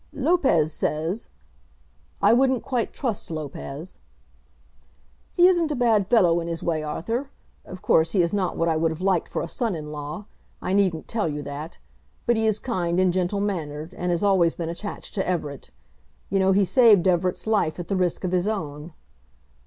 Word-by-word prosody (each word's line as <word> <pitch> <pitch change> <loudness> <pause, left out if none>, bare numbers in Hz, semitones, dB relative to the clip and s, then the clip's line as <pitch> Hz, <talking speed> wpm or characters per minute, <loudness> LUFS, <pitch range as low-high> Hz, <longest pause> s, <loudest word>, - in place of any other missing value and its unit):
"Lopez 265 - +2
says 160 +10 -2 0.5
" - - -36
"I - - +6
wouldn't 260 0 +2
quite 245 -4 -1
trust 235 -8 -4
Lopez." 155 +1 -7 1.4
"He 350 - +7
isn't 345 -3 +4
a - - 0
bad 225 -6 +2
fellow 180 -7 +4
in 170 - -4
his 165 -1 -4
way, 160 -2 0
Arthur. 225 - -3 0.4
Of 185 +1 -10
course 165 -5 +3
he 185 - +4
is 170 - -1
not 195 -3 -1
what 165 - +1
I 165 - +2
would 165 +1 +2
have 160 0 -6
liked 190 -2 +1
for - - -2
a - - -4
son 225 +2 -2
in 150 -1 -7
law. 150 +6 -6 0.3
I 185 - -2
needn't 190 -5 +1
tell 215 -7 -1
you 145 -1 -4
that. 145 +3 -7 0.5
But 240 - +3
he 220 0 +1
is 215 -1 +2
kind 180 -7 -1
and 185 -1 +3
gentle 185 +2 0
mannered, 160 -5 -3
and 180 -1 -3
has 175 +2 0
always 185 -5 +3
been 165 -1 -4
attached 200 +5 -6
to 195 -3 -2
Everett. 150 -6 -3 0.6
You 195 - +2
know 190 0 +3
he 195 +1 +4
saved 210 -5 +5
Everett's 180 0 +1
life 210 -8 +1
at 175 -2 -6
the 195 - -1
risk 180 -1 0
of 180 - -1
his 180 +1 +1
own." 155 -6 -4
180 Hz, 190 wpm, -24 LUFS, 165-215 Hz, 1.4 s, He